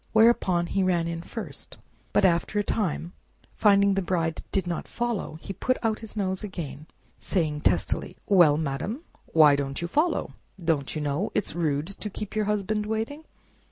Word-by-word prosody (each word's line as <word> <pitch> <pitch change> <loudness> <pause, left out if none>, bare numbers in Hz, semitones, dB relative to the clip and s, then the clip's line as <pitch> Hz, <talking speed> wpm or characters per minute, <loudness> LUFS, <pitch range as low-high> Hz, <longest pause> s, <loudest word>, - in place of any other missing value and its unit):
Whereupon 220 -6 +4
he 195 +3 0
ran 175 -3 +2
in 165 0 -3
first, 225 +6 -5 0.3
but - - +4
after 175 +3 +2
a 205 - +3
time, 180 -5 -2 0.4
finding 200 -2 +4
the 195 - +1
Bride 165 -3 -1
did 190 -2 0
not 175 -2 -3
follow, 235 -9 -2
he 195 - -6
put 255 +7 0 0.2
his 225 -1 -9
nose 190 -3 -1
out - - -1
again, 160 -6 -6 0.3
saying 155 -5 -1
testily, - - 0
"Well, 175 -7 +6
madam, 160 - -3 0.2
why 150 -3 +6
don't 140 -1 -3
you 170 - -2
follow? 305 - +1 0.2
Don't 165 -6 -1
you 155 - -2
know 150 +7 -1
it's 210 - 0
rude 150 -3 0
to 200 +3 -6
keep 210 +1 -6
your 215 -1 +1
husband 210 +1 0
waiting?" 225 +8 -3
185 Hz, 170 wpm, -26 LUFS, 160-210 Hz, 0.4 s, Well